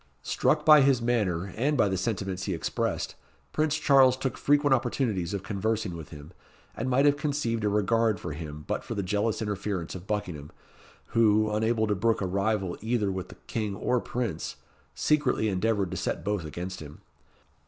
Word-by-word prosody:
Struck - - +1
by 150 -2 +9
his 135 -2 +4
manner, 100 -7 0
and 140 +6 +1
by 110 - +4
the 95 - 0
sentiments 95 -2 -2
he 95 - -1
expressed, 80 - -2 0.4
Prince 155 0 +1
Charles 135 -4 +5
took 130 0 -2
frequent 145 -1 +3
opportunities 110 -8 0
of 100 -2 -3
conversing 105 -1 -2
with 80 -3 -8
him, 75 +1 -11 0.4
and 130 - -2
might 130 +3 +3
have 145 0 +4
conceived 140 -7 -1
a 105 - +2
regard 105 0 +2
for 85 - -5
him 75 -1 -7
but - - -2
for - - -5
the 100 - -1
jealous 105 +4 0
interference 100 -4 -3
of 95 +1 -9
Buckingham, 90 -9 -3 0.6
who, 110 -1 +4
unable 110 +1 +1
to 105 - +1
brook 110 +3 +1
a 95 - -1
rival 100 0 -1
either 110 -3 0
with 95 -1 -5
the - - -11
King 105 -3 -3
or 125 +5 +1
Prince, 115 -10 -3 0.4
secretly 145 -7 +2
endeavoured 100 -1 0
to 95 - -3
set - - -3
both 100 -4 -1
against 90 +4 -6
him. 75 -1 -11
105 Hz, 180 wpm, -28 LUFS, 95-120 Hz, 0.6 s, by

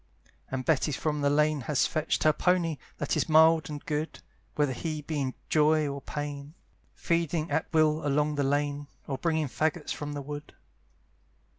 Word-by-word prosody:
And 130 -1 -3
Betty 155 -1 +2
from 150 +1 -1
the 140 - +3
lane 150 0 +2
has 145 -6 +3
fetched 155 -2 0
Her 155 - +5
pony, 170 -2 +1 0.2
that 150 - -1
is - - 0
mild 160 +1 +5
and 145 -1 -7
good, 150 +1 -3 0.4
Whether 145 -3 +1
he 155 +3 -4
be 150 -1 -2
in 130 -1 -2
joy 155 0 +3
or 140 0 -4
pain, 145 +1 -6 0.4
Feeding 165 -1 -1
at 160 - -1
will 155 -1 +3
along 150 +1 +1
the 145 -1 0
lane, 145 +1 0 0.2
Or 135 -2 -4
bringing 160 -2 +1
faggots 155 +3 -1
from 145 0 -5
the 145 -1 -5
wood. 145 +1 -8
150 Hz, 170 wpm, -28 LUFS, 145-155 Hz, 0.4 s, Her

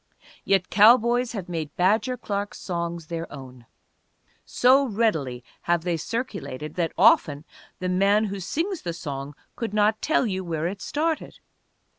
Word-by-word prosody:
Yet 190 -2 +1
cowboys 235 +3 +5
have 195 -6 -5
made 160 -4 -5
Badger 220 +8 +2
Clark's 205 -3 -4
songs 170 -2 -4
their 165 +1 -5
own. 130 -4 -11 0.8
So 260 +3 +4
readily 160 - -1 0.3
have 175 -1 +2
they 175 -1 0
circulated 155 - -5
that 170 -2 -1
often 160 -7 +4 0.3
the 185 - -3
man 200 +3 +3
who 200 -2 -3
sings 330 - -2
the 170 -2 -4
song 140 -3 -6 0.2
could 225 -3 -4
not 215 +1 +2
tell 305 - +2
you 190 -4 -2
where 165 -2 -3
it 190 +3 -4
started. 315 +2 -2
185 Hz, 145 wpm, -25 LUFS, 165-225 Hz, 0.8 s, cowboys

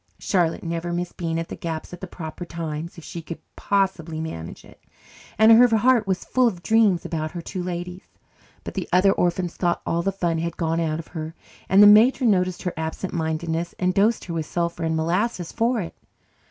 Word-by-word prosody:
Charlotte 175 -4 0
never 170 +1 -3
missed 175 0 -3
being 165 -2 -2
at 165 - -4
the - - -5
gaps 165 0 -5
at 175 - -9
the 190 - -5
proper 165 0 -7
times, 165 -1 -6
if 170 - -10
she 170 - -7
could 165 +1 -7 0.2
possibly 185 -5 -1
manage 85 - -7
it, - - -19 0.5
and 220 +1 +7
her 240 +2 +8
heart 235 -2 +3
was 190 -1 -1
full 255 -1 +3
of 180 -6 -3
dreams 220 -6 +3
about 155 -2 -3
her 175 - -5
two 185 - -5
Ladies. 180 +1 -5 0.6
But - - -7
the - - -4
other 185 +2 +5
orphans 175 -1 0
thought 175 -2 0
all 170 - 0
the 195 - 0
fun 170 -4 -1
had 170 0 -3
gone 165 -1 0
out 155 -2 -1
of 165 - -9
her, 160 -1 -6 0.3
and 195 +2 +7
the - - +10
matron 225 +3 +6
noticed 180 -2 0
her 180 - -2
absent 160 +4 -4
mindedness 165 0 -2
and 185 0 +1
dosed 215 +4 +2
her 170 - -5
with 160 -2 -3
sulphur 170 -1 -2
and 160 0 0
molasses 175 +3 -1
for 235 +1 +1
it. 170 - -6
175 Hz, 205 wpm, -23 LUFS, 165-195 Hz, 0.6 s, the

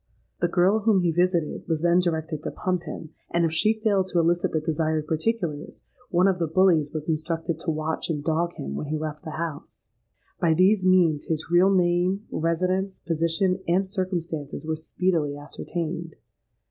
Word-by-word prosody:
The 175 - +2
girl 185 +5 +3
whom 210 -3 +3
he 175 -1 +2
visited, 175 -1 0
was 160 -2 -1
then 175 +1 +4
directed 160 -3 -1
to - - -3
pump 180 -2 -2
him; 160 - -7 0.2
and 170 0 +2
if 165 - 0
she 215 +7 +2
failed 200 -4 +2
to 180 - -2
elicit 170 +1 +2
the 160 - +1
desired 155 -1 -1
particulars, 160 -1 -2 0.3
one 180 +2 +3
of 190 -2 +1
the 165 - 0
bullies 160 -3 +3
was 155 -2 -5
instructed 165 0 -2
to 165 - -3
watch 155 +1 -2
and 150 -3 -2
dog 170 +2 0
him 70 - -6
when 145 - -4
he 155 +1 -1
left 155 -1 -5
the 155 -2 -6
house. 160 -3 -6 0.5
By 165 -2 +3
these 190 +3 +4
means, 175 -5 +3
his 160 +1 -3
real 180 +2 +5
name, 180 +2 +2
residence, 185 +4 0
position, 170 +3 0
and 180 +3 +2
circumstances, 175 -7 -4
were 160 0 -1
speedily 160 -2 -1
ascertained. 165 +2 -5
170 Hz, 175 wpm, -25 LUFS, 155-185 Hz, 0.5 s, real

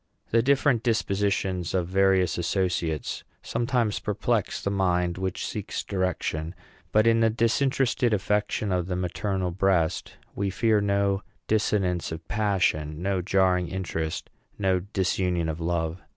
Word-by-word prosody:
The 115 - +4
different 135 -1 +3
dispositions 100 -5 0
of 90 -2 0
various 95 -1 +3
associates 85 -3 -1 0.2
sometimes 115 -3 0
perplex - - -1
the 100 - -2
mind 90 -2 +1
which 95 -1 -2
seeks - - -4
direction; 90 -3 -2 0.4
but 110 +1 +4
in 115 0 +4
the 115 0 +4
disinterested 120 +2 +1
affection 105 0 0
of 90 -1 0
the 90 - -2
maternal 90 +1 -2
breast 90 -2 +1 0.2
we 100 0 -1
fear 110 +2 +2
no 100 -1 +1 0.3
dissonance 95 -6 +1
of 80 - -7
passion, 90 -7 0
no 95 -1 0
jarring 90 -1 +2
interests, 80 -3 -3 0.3
no 95 -2 +2
disunion 90 -3 0
of 80 0 -3
love. 85 0 -1
95 Hz, 130 wpm, -26 LUFS, 90-105 Hz, 0.4 s, The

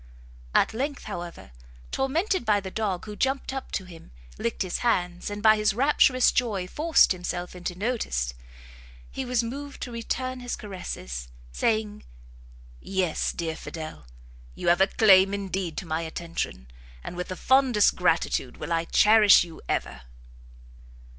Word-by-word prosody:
At - - +4
length, 280 +5 -3
however, 170 - -7 0.4
tormented 330 - 0
by 210 -3 +3
the 190 -1 -7
dog, 200 -5 -2
who 210 -1 -7
jumpt 265 +3 -1
up 270 - -6
to 190 - -2
him, 170 -3 -13 0.3
licked 115 - -1
his 185 - -3
hands, 180 -7 0
and 205 0 -6
by 220 -1 +7
his 210 -1 +1
rapturous 255 -1 +4
joy 210 -7 0
forced 320 - +4
himself 180 -1 -4
into 180 0 -5
notice, 185 - -1 0.8
he 265 - -4
was 245 -1 +1
moved 280 +5 -6
to 250 - -6
return 255 +2 -3
his 245 0 -4
caresses, - - -6 0.2
saying, 215 - -1 0.8
"Yes, 185 - -1
dear 165 -2 -3
Fidel! 155 - -8 0.5
you - - 0
have 175 +2 +4
a 190 - +6
claim 195 -2 +5
indeed 190 -4 -3
to - - -4
my 160 0 -2
attention, 160 - -5 0.4
and - - -7
with 180 0 -4
the 185 - -5
fondest 260 -2 +3
gratitude - - 0
will 170 - -3
I 165 0 0
cherish 210 +1 +6
you 170 -2 -11
ever!" 65 - -2
200 Hz, 150 wpm, -26 LUFS, 175-245 Hz, 0.8 s, by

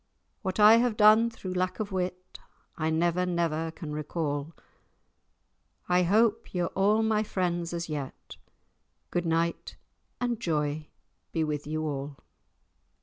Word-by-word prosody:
What 190 -2 -3
I 215 +2 +8
have 235 -2 +1
done 215 +2 +6
thro' 200 -5 -7
lack 185 +2 -1
of 215 -1 -3
wit, 185 -1 -4 0.4
I 155 0 -1
never, 170 +2 +1
never 165 -2 -1
can 160 -2 -7
recall; 150 0 -3 1.3
I 180 0 +3
hope 215 +4 +2
ye're 175 -1 0
a' 210 +3 +3
my 220 -1 +2
friends 175 -5 -2
as 170 -1 -3
yet; 145 -4 -6 0.7
Good 175 -1 -1
night 165 +1 -1 0.4
and 240 -2 -1
joy 150 -5 -1 0.4
be 160 - 0
with 150 -1 -3
you 155 +1 -2
all!" 140 -2 -4
175 Hz, 135 wpm, -28 LUFS, 155-205 Hz, 1.3 s, I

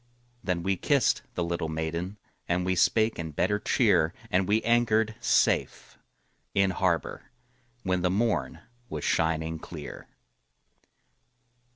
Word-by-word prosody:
Then 90 -2 -1
we 95 0 0
kissed 140 +3 +2
the 90 - -1
little 85 -1 -2
maiden, 85 +5 -3 0.3
And 90 +1 0
we 95 - +1
spake 110 +4 +2
in 80 -1 -4
better 105 +7 +1
cheer, 80 -4 +2 0.2
And 90 0 +2
we 105 +2 +2
anchored 110 -2 +2
safe 120 - +1 0.6
in 95 -1 +3
harbor 90 -2 -1 0.6
When 95 -1 0
the 90 - +2
morn 110 +5 0 0.3
was 75 -2 -5
shining 80 0 0
clear. - - -9
90 Hz, 120 wpm, -27 LUFS, 85-105 Hz, 0.6 s, in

